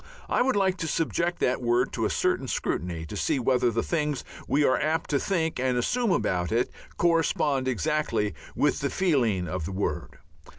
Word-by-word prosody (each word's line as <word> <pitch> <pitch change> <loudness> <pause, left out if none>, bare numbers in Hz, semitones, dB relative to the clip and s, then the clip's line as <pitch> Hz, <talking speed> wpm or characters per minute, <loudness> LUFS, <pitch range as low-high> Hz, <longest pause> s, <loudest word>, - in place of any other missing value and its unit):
I - - +1
would 260 -1 +2
like 190 -2 +2
to 165 -2 -3
subject 170 +2 0
that 125 +1 +1
word 120 0 +1
to - - -1
a - - +1
certain - - 0
scrutiny 85 -1 -2
to - - -7
see 155 - 0
whether 125 -1 +2
the 115 0 -1
things 150 -5 -1 0.2
we 145 +2 +2
are 130 - +3
apt 160 +2 0
to 140 - +2
think 165 -6 -1
and 130 -1 +1
assume 235 - +1
about 90 - 0
it 115 +2 +1 0.3
correspond 155 -5 +2
exactly 115 - 0 0.2
with 145 - +2
the 140 - -1
feeling 120 - +1
of 90 -3 -3
the 95 - -4
word. 95 -6 -3
135 Hz, 185 wpm, -27 LUFS, 115-165 Hz, 0.3 s, are